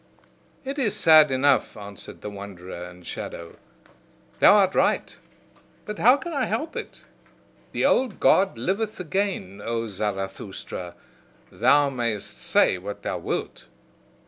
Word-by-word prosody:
"It 275 +2 -4
is 225 -7 +1
sad 155 -2 +7
enough," 135 -1 +2
answered 100 -1 -10
the 105 - -6
wanderer 95 -3 -8
and 90 0 -15
shadow, 85 0 -7 0.8
"thou - - +7
art 195 -2 +4
right: - - +1 0.7
but 210 0 -6
how 250 +5 +6
can 330 +5 -6
I 275 -3 0
help 320 +1 -3
it! - - -7 0.7
The - - 0
old 250 -5 +2
God 195 0 +3
liveth 210 +3 -2
again, 175 - -2
O 115 0 -2
Zarathustra, 95 -3 -5 0.6
thou 140 +4 +3
mayst 115 -5 -3
say 90 - +3
what 100 +2 -7
thou - - -3
wilt. - - -4
130 Hz, 130 wpm, -24 LUFS, -, 0.8 s, sad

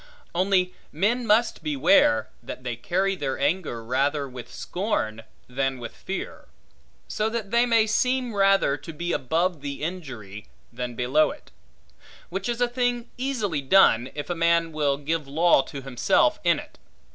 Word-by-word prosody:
Only 185 0 +2 0.2
men 225 +9 0
must 220 +3 +3
beware, 290 0 +3
that 130 - -8
they 120 -2 -3
carry 190 +10 0
their 135 -7 -3
anger 145 -5 -1
rather 140 +4 0
with 125 -2 -10
scorn, 175 - -2 0.3
than 135 +1 -1
with 120 -2 -8
fear; 195 - -6 0.6
so 215 +1 -1
that 220 -3 -4
they 235 +1 +3
may 230 -2 +4
seem 250 +2 0
rather 195 -7 +3
to 145 +4 -9
be 175 +3 -3
above 165 +4 0
the 140 0 -5
injury, 130 - -6 0.3
than 120 0 -5
below 130 +6 +3
it; - - -11 0.8
which 195 +5 -3
is 240 0 -2
a 245 - +4
thing 245 -1 -1
easily 225 - -2
done, 130 -5 +4
if 150 +4 -4
a - - -1
man 170 0 +2
will 145 -3 0
give 150 +1 -2
law 160 +2 +4
to 135 0 -8
himself 125 -2 +2
in - - +4
it. - - -11
170 Hz, 155 wpm, -25 LUFS, 135-215 Hz, 0.8 s, may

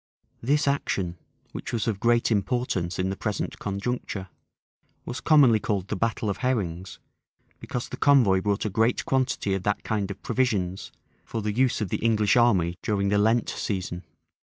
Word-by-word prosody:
This 145 +5 +1
action, 95 -10 -1 0.4
which - - -6
was 115 -1 -1
of 105 -4 -1
great 120 +1 +2
importance 100 -5 -1
in 95 +1 0
the - - -3
present 105 0 -3
conjuncture, 100 -1 -4 0.8
was 125 - -5
commonly 140 -8 +5
called 100 -3 -2
the - - -1
battle 115 +1 -1
of 100 -1 -1
Herrings; 95 -9 -2 0.6
because 125 - -4
the - - -7
convoy 120 -10 +4
brought 100 +1 -1
a - - 0
great 115 +4 +1
quantity 130 -6 0
of 95 - -1
that 105 +2 -1
kind 105 -3 -1
of 100 - -8
provisions, 105 -7 -1 0.3
for 115 -2 -5
the 105 0 -1
use 125 0 +1
of 105 - -2
the - - -1
English 110 -3 +2
army 95 -8 +3
during 100 -2 0
the 100 0 +2
Lent 110 +2 +2
season. 90 -3 -3
105 Hz, 170 wpm, -26 LUFS, 95-120 Hz, 0.8 s, commonly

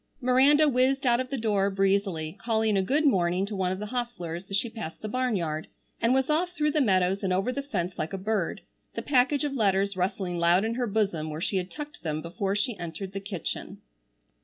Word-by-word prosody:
Miranda 275 +4 +5
whizzed 270 +1 +2
out 240 -1 +4
of 255 0 -3
the 275 - -2
door 205 -4 +1
breezily, 195 -4 0
calling 220 -2 +1
a 195 - +3
good 285 +11 +1
morning 185 -6 +2
to 205 +1 -4
one 185 -1 0
of 185 - -2
the 210 - -5
hostlers 200 -7 -4
as 195 - +1
she 235 - 0
passed 220 -7 -7
the - - -2
barnyard, 200 -10 -1 0.3
and 230 - +3
was 265 0 +3
off 345 +4 +1
through 300 -3 +1
the 300 - +2
meadows 190 -4 +2
and 190 - -1
over 195 +7 +1
the 280 - -3
fence 185 -10 -3
like 155 - -2
a 195 - -3
bird, 195 -2 -1 0.3
the - - -3
package 280 +2 +2
of 290 -2 -1
letters 200 -4 +1
rustling 180 -1 -2
loud 175 +4 +4
in 225 - -1
her 245 0 -1
bosom 195 -7 0
where 155 0 -5
she 190 +3 0
had 180 0 -2
tucked 295 +4 -8
them 155 -2 -2
before 190 +5 -2
she 215 +3 0
entered 175 +3 -6
the 195 - -3
kitchen. 195 -3 -5
200 Hz, 220 wpm, -27 LUFS, 185-250 Hz, 0.3 s, Miranda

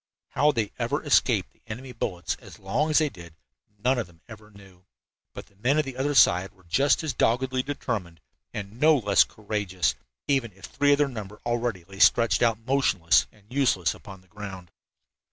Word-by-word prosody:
How 150 +1 +3
they 110 -6 -2
ever - - -1
escaped - - +2
the - - -34
enemy 125 +4 -7
bullets 95 -7 -3
as - - -13
long 120 +11 -1
as 155 - +3
they 155 - +4
did 85 - -13 0.4
none 125 +4 +1
of 110 - -3
them 85 -2 -22
ever 110 -2 -13
knew, 95 -3 -18 0.5
but - - -9
the 100 - -28
men 125 +8 +1
of 155 - +2
the 135 -2 -7
other 140 +3 -1
side 95 -5 +4
were 95 - -25
just 135 - +2
as 155 -4 -2
doggedly 130 +2 +1
determined, 115 - -4 0.3
and 105 +2 -7
no 155 +1 +5
less 105 -5 +4
courageous, 105 -4 -2 0.3
even 130 -7 0
if 95 +1 -12
three 145 0 +2
of - - +3
their 145 0 +2
number 105 -5 -8
already 120 -6 -1
lay 95 +3 -13
stretched 115 0 +4
out 115 -2 +3
motionless 125 -11 +2
and 105 +2 -19
useless 125 -11 +2
upon 95 -2 -12
the 95 - -27
ground. 95 -3 -9
110 Hz, 190 wpm, -26 LUFS, 95-130 Hz, 0.5 s, no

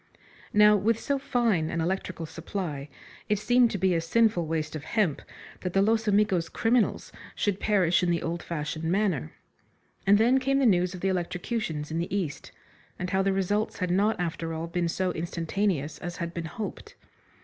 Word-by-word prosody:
Now, 210 0 +6
with 220 +3 +1
so 280 -1 -1
fine 230 - +1
an 170 - -2
electrical 175 0 -2
supply, 160 -3 -5 0.4
it 210 - +3
seemed 245 +3 +4
to 205 - -3
be 190 -1 +2
a 165 - +1
sinful 180 -1 +2
waste 155 -1 -2
of 150 - -5
hemp 160 - 0 0.4
that 180 -1 -4
the 195 - +4
Los 220 +1 +1
Amigos 200 -5 +2
criminals 235 0 +1 0.2
should 200 -2 0
perish 185 -5 +3
in 180 - +1
the 170 -1 0
old 170 0 -3
fashioned 155 0 -4
manner. 180 - 0 0.8
And 200 +1 +7
then 240 +5 +4
came 275 +1 +1
the 275 - +3
news 180 -4 +3
of 180 - -9
the 195 - +1
eleotrocutions 175 -3 -3
in 165 - -1
the 170 - -3
East, 155 -7 -4 0.5
and 180 0 -4
how 190 0 +2
the 195 0 +2
results 195 +3 0
had 180 -2 -1
not 205 +3 +2
after 165 -1 -3
all 160 +1 -3
been 170 0 -1
so 185 +2 -1
instantaneous 170 -1 -2
as 175 -1 -6
had 170 -1 -4
been 170 -1 -4
hoped. 205 +7 -7
180 Hz, 185 wpm, -27 LUFS, 165-210 Hz, 0.8 s, And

